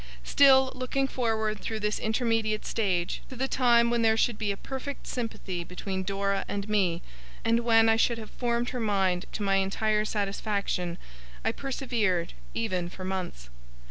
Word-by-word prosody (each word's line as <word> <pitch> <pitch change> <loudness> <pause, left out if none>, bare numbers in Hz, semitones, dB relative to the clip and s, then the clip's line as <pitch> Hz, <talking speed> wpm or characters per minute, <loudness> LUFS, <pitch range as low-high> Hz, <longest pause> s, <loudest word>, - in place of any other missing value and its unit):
Still, 265 - +6
looking 255 +2 -1
forward 220 -4 -1
through 220 +1 -4
this 210 0 0
intermediate 220 -1 0
stage, 185 -6 -1
to 260 - -8
the 265 +2 -1
time 235 -3 +4
when 235 -1 +2
there 220 -1 +4
should 225 -1 +1
be 210 -2 0
a 200 - -4
perfect 275 +4 -6
sympathy 200 -7 -4
between 190 +2 -4
Dora 195 +1 -1
and 200 0 -3
me, 185 -5 +1 0.4
and 230 +1 +4
when 225 -1 +5
I 225 0 +4
should 235 +1 +2
have 220 -2 -9
'formed 240 0 -1
her 250 - -4
mind' 195 -4 +1
to 210 - -3
my 195 -1 +3
entire 210 +2 +1
satisfaction, 200 -4 -2 0.5
I - - +3
persevered, 230 -10 -1 0.2
even 185 -6 -1
for 185 - -9
months. 180 - -4
215 Hz, 165 wpm, -28 LUFS, 195-235 Hz, 0.5 s, Still